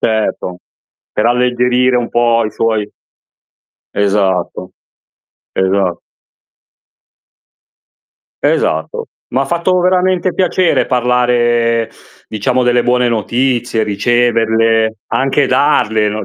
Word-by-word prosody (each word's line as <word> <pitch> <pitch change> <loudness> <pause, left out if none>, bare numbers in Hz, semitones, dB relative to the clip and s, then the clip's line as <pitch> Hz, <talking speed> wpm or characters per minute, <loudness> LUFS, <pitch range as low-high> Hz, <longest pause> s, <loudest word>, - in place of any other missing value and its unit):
Certo, 110 -5 -1 0.5
per - - 0
alleggerire 125 +1 +2
un 120 -1 -1
po' 120 -1 +2
i 105 - -3
suoi 110 -2 -1 1.0
Esatto, 100 -3 -1 0.8
esa 95 -2 0 2.5
Esatto. 80 0 -1 0.2
M'ha 135 +3 0
fatto 175 +3 0
veramente 185 0 +1
piacere 185 -1 +1
parlare, 120 -2 +1 0.4
diciamo, 125 +4 -1
delle 120 0 +2
buone 125 0 +1
notizie, 120 +1 -1
riceverle, 115 +1 +1
anche 135 +1 +1
darle, 115 -6 +2
no, 105 +1 -4
120 Hz, 85 wpm, -14 LUFS, 110-125 Hz, 2.5 s, alleggerire